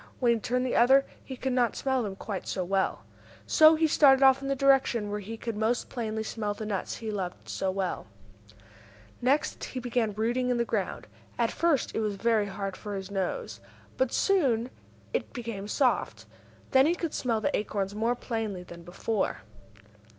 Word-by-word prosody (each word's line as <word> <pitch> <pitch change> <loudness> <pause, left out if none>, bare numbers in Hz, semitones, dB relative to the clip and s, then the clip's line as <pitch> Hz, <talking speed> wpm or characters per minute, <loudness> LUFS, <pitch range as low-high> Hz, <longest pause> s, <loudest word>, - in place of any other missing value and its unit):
When 240 -2 +4
he 230 - -1
turned 250 +3 -1
the 255 - -1
other 265 +3 +6
way - - -20 0.2
he 265 - -7
could 265 0 -2
not 245 -2 +2
smell 265 -2 0
them 200 -4 -4
quite 195 -1 -5
so 185 - -2
well. 195 +1 0 0.4
So 315 0 +7
he 320 +1 +2
started 275 -3 +5
off 265 0 +6
in 275 - -4
the 275 - +1
direction 265 -6 +3
where 210 - -2
he 220 +3 -7
could 230 -1 -4
most 220 +3 0
plainly 220 -3 -3
smell 210 -2 -3
the 215 - -6
nuts 200 -3 -3
he 220 -1 -5
loved 185 -4 -5
so 190 - -2
well. 190 -1 -3 1.1
Next 270 +4 +1
he 255 - -5
began 240 -3 -1
rooting 240 +4 0
in 245 - +1
the 235 - +1
ground. - - -2 0.3
At - - +1
first 335 -6 +1
it - - -1
was 210 -2 -1
very 220 0 +1
hard 195 -1 -4
for 205 0 -6
his 190 0 -6
nose, 200 - -3 0.4
but 260 -1 +1
soon 260 - +2 0.4
it - - -2
became 230 -5 -5
soft. 255 +4 0 0.5
Then 265 +2 +6
he 340 - +2
could 335 -3 -4
smell 230 -3 0
the 215 - 0
acorns 200 -2 -2
more 225 +3 0
plainly 220 -7 -4
than 170 -1 -11
before. 190 +5 -2
230 Hz, 190 wpm, -28 LUFS, 205-260 Hz, 1.1 s, So